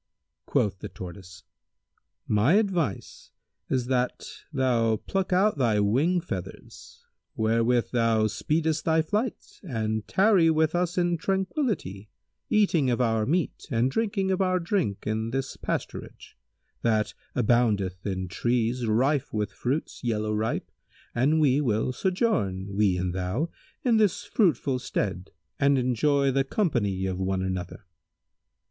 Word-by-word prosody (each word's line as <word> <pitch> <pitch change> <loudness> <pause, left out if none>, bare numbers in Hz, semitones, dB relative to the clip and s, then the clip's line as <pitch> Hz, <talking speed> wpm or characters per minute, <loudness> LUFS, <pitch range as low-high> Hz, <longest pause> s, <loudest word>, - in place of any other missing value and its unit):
Quoth 95 -2 +1
the - - -7
Tortoise, 90 0 -10 0.8
"My 110 - +3
advice 180 - -1 0.4
is 130 -2 0
that 125 0 -1 0.3
thou 115 -4 +2
pluck 190 - -3
out 185 -2 +3
thy 115 -5 +2
wing 135 - +2
feathers, 95 - -8 0.3
wherewith 115 +1 +1
thou 115 -2 +2
speedest 155 - 0
thy 160 -1 +2
flight, 210 +8 -3
and 110 - -3
tarry 190 -4 +4
with 160 0 +2
us 175 0 0
in 175 -1 +2
tranquillity, 190 - -2 0.4
eating 175 -10 +3
of 120 - 0
our 115 -3 +1
meat 170 +5 -1
and 125 0 +1
drinking 200 0 0
of 190 - +1
our 185 -1 +2
drink 170 - -1
in 110 +1 -1
this 135 +2 -3
pasturage, - - -5 0.5
that 110 -2 +1 0.2
aboundeth 105 -6 +1
in 95 -2 -3
trees 120 +4 0
rife 135 +6 +1
with 105 -1 -2
fruits 135 +4 -3
yellow 110 -2 -1
ripe 110 +1 -2 0.4
and 145 +6 +2
we 145 -2 +3
will 115 -1 0
sojourn, 100 - -1
we 100 -3 +2
and 90 0 -2
thou, 95 - -2 0.3
in 240 -4 +3
this 210 -4 +2
fruitful 140 - +1
stead 95 -6 -3 0.3
and 140 0 +4
enjoy 135 +3 +2
the 135 +1 +2
company 115 - 0
of 95 -1 -2
one 95 0 -1
another." 95 0 -4
125 Hz, 130 wpm, -26 LUFS, 105-165 Hz, 0.8 s, tarry